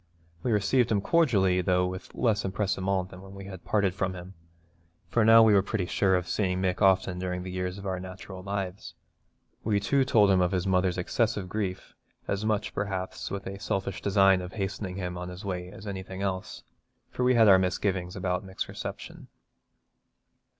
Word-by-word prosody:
We 125 - -1
received 110 +4 +2
him 105 - +3
cordially, 100 - +3
though 90 0 +2
with 95 +1 -6
less 110 -3 +1
empressement 95 -1 -1
than 90 0 -11
when 95 0 -12
we 100 0 -9
had 95 -2 -9
parted 100 -3 +1
from 95 0 -2
him, 90 +1 -9 0.8
for 115 - +2
now 115 +1 +8
we 110 -1 +5
were 100 - +6
pretty 95 -1 -2
sure 95 +1 +2
of 90 -1 -1
seeing 95 -3 0
Mick 95 0 -1
often 95 -2 +3
during 90 0 -3
the 95 - -6
years 90 +1 -3
of 100 - -9
our 95 -1 -2
natural 95 0 -9
lives. 100 -1 -5 0.7
We 105 -2 +1
too 135 +7 +2
told 105 -6 +4
him 95 -1 +4
of 90 +1 +1
his 90 0 0
mother's 95 -1 +1
excessive 105 +2 0
grief, 95 -2 -4 0.3
as 100 +1 -1
much, 110 -1 -1
perhaps, 95 -2 -3
with 100 0 -5
a 100 0 -6
selfish 95 -1 -3
design 95 -2 +4
of 90 0 -8
hastening 95 -2 -4
him 90 -2 -4
on 90 0 -5
his 90 +2 -9
way 90 -2 -4
as 100 - -11
anything 95 -1 -5
else, 95 -1 -4 0.5
for 125 - -2
we 125 0 +4
had 115 -2 +6
our 95 -2 +8
misgivings 90 -1 -1
about 90 +1 -1
Mick's 95 -1 -5
reception. - - -7
95 Hz, 190 wpm, -28 LUFS, 90-100 Hz, 0.8 s, now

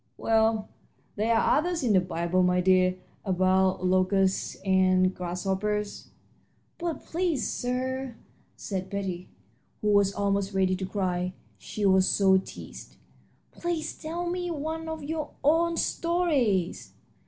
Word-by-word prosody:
"Well, 220 -1 +2 0.5
there 225 +2 +1
are 225 - +3
others 345 -1 -2
in 230 -4 +2
the 190 - +6
Bible, 175 0 0
my 180 0 +3
dear, 185 0 +3 0.3
about 185 -1 +2
locusts 185 +1 +2
and 185 -1 +3
grasshoppers." 195 +4 -3 0.7
"But, 340 -2 -4
please, 335 -5 -1
sir," 255 0 -3 0.4
said 190 -2 -5
Betty, 190 -3 -4 0.5
who 210 - +2
was 200 -1 +4
almost 200 0 -1
ready 190 -1 +2
to 190 0 -4
cry, 185 -2 -2 0.3
she 210 - -4
was 190 -1 +4
so 190 -1 +4
teased - - -10 0.6
"please 345 -3 -3
tell 340 +2 -4
me 355 0 -2
one 320 +1 -4
of 320 -2 -5
your 305 0 -3
own 330 +3 +3
stories." 290 - 0
200 Hz, 125 wpm, -27 LUFS, 185-295 Hz, 0.7 s, the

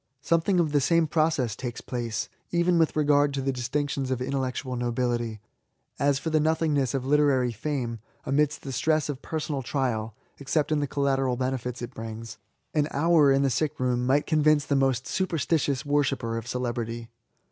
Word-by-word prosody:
Something 170 +3 +2
of 160 -3 +2
the 145 -1 +3
same 165 +4 +3
process 155 -8 +1
takes 120 -2 -5
place^ 120 -3 -3 0.2
even 170 0 +2
with 160 - +2
regard 145 -1 +3
to 135 - -1
the 135 - +1
distinctions 135 +1 -2
of 130 -1 -1
intellectual 130 0 -2
nobility* 120 -2 -1 0.6
As 140 -1 +3
for 160 +3 -3
the 155 - +3
nothingness 150 -4 +1
of 130 -1 -2
literary 135 -4 +3
fame^ 120 -1 -3 0.3
amidst 150 +2 +1
the 135 - -5
stress 155 +4 +1
of 140 -2 -4
personal 150 -3 -3
trial 120 -5 -2 0.2
(except 145 +2 0
in 155 - +2
the 145 - -1
collateral 135 -3 0
benefits 125 -1 -3
it 120 - -6
brings)^ 115 0 -7 0.4
an 150 -2 +2
hour 155 -1 +4
in 135 +1 +3
the 135 - +2
sick 150 +4 -1
room 125 -1 +1
might 140 +3 +3
convince 155 -2 +3
the 140 - 0
most 135 -2 +1
superstitious 160 -6 0
worshipper 135 -5 0
of 115 0 -5
celebrity. 120 -2 -3
135 Hz, 170 wpm, -26 LUFS, 125-150 Hz, 0.6 s, hour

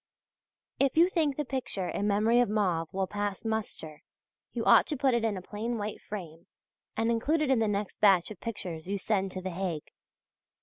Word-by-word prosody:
If 275 +1 +2
you 345 +2 +6
think 305 -6 +1
the 295 - -1
picture 250 -8 -2
"In 205 - -1
Memory 215 +4 +3
of 245 - +3
Mauve" 180 -7 0
will 190 0 0
pass 205 +2 -3
muster, 210 -9 -3 0.5
you - - -3
ought - - +6
to 300 - -2
put 265 0 +2
it 235 -1 +1
in 215 -3 0
a 185 - -7
plain 225 +5 -3
white 210 0 -4
frame 170 -6 -8 0.5
and 225 +1 +2
include 295 +8 +1
it 275 - +1
in 260 - +4
the 220 - +2
next 205 -1 -3
batch 195 -2 +5
of 200 - -9
pictures 180 -7 -5
you 200 +1 -1
send 195 -1 0
to 185 - -4
the 185 - -3
Hague. 175 -4 -4
210 Hz, 205 wpm, -29 LUFS, 190-235 Hz, 0.5 s, you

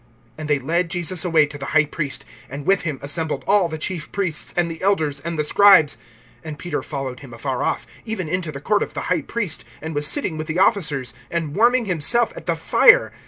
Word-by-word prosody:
(53)And 155 - -5
they 150 -1 +2
led 165 +6 -1
Jesus 175 -1 +1
away 165 -4 +4
to 145 0 -10
the 135 - -6
high 145 - +5
priest; 140 -4 -4 0.2
and 140 +2 -7
with 195 +1 +3
him 155 -5 -3
assembled 145 -1 -2
all 200 -3 +3
the 160 - -5
chief 160 -1 -4
priests 185 -6 -1
and 170 -1 +1
the 165 - -9
elders 160 -7 +1
and 165 +2 -5
the 150 - +1
scribes. 170 -4 +6 0.5
(54)And 155 -2 -7
Peter 175 +4 -3
followed 135 -4 -5
him 125 -4 -11
afar 130 +2 -3
off, - - -1 0.2
even 220 -7 -4
into 170 -1 -2
the 140 - -7
court 205 +8 +1
of - - -4
the - - -2
high 170 - -1
priest, 200 -1 -3 0.2
and 160 +1 -6
was 145 0 0
sitting 180 - -1
with 155 - -4
the 160 +1 -3
officers, 150 - +1 0.2
and 165 -3 -3
warming 240 +2 +3
himself 205 +7 +1
at - - -10
the - - +1
fire. - - +5
160 Hz, 220 wpm, -21 LUFS, 145-185 Hz, 0.5 s, scribes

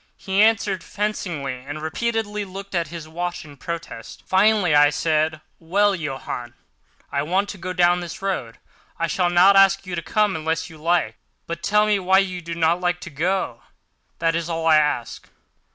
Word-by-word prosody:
He 195 +1 0
answered 205 -4 +2
fencingly, 170 -11 -3
and 145 +3 -6
repeatedly 210 +4 -2
looked 195 +1 -9
at 170 -2 0
his 165 -2 -8
watch 175 +2 -4
in 145 -2 -13
protest. 165 -7 -7
Finally 190 -3 +3
I 145 0 +6
said: 155 +1 0 0.2
"Well, 200 +5 +2
Johann, 135 -7 -5 0.6
I 140 - 0
want 190 +7 0
to 205 - -7
go 185 +2 -4
down 175 0 +3
this 175 -2 -7
road. 185 -13 -3 0.4
I 165 - 0
shall 175 +1 +1
not 180 +3 +6
ask 195 0 +5
you 185 - -6
to 170 - -2
come 210 +2 +1
unless 165 +1 -2
you 160 - -13
like; 170 +3 0 0.3
but 170 - -5
tell 210 +1 +3
me 210 -1 +2
why 190 0 +3
you 185 -2 0
do 170 0 -6
not 165 +2 +2
like 175 -1 0
to 175 - -8
go, 160 -5 -1 0.6
that 165 0 +1
is 170 0 -2
all 165 -1 -2
I 160 -1 +6
ask." 150 -6 -1
175 Hz, 185 wpm, -22 LUFS, 160-195 Hz, 0.6 s, I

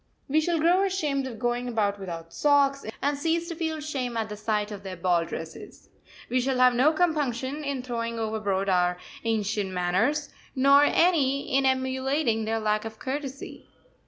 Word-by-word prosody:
We 310 +3 +2
shall 340 +1 0
grow 345 +4 +4
ashamed 300 -9 -1
of 235 -4 -7
going 240 +2 -1
about 205 -4 0
without 165 -3 -7
socks, 280 -1 +3 0.2
and 285 +1 +1
cease 330 +3 -1
to 335 - -4
feel 320 -1 -2
shame 265 -6 -3
at 220 -1 -2
the 210 - -5
sight 210 0 -1
of 205 -2 -7
their 190 -2 -7
ball 175 -1 +1
dresses. - - -9 0.4
We 255 +1 +1
shall 260 +1 0
have 250 0 +5
no 260 +6 +4
compunction 295 -4 -1
in 280 -3 -3
throwing 230 -2 -3
overboard 215 -3 -1
our 180 -1 +2 0.3
ancient 215 -3 -1
manners, 190 +12 0 0.3
nor 275 +2 +6
any 280 -6 +2
in 270 0 +3
emulating 260 -2 0
their 225 +1 -1
lack 215 -1 0
of 220 -1 -7
courtesy. 275 +2 -6
255 Hz, 170 wpm, -26 LUFS, 215-285 Hz, 0.4 s, nor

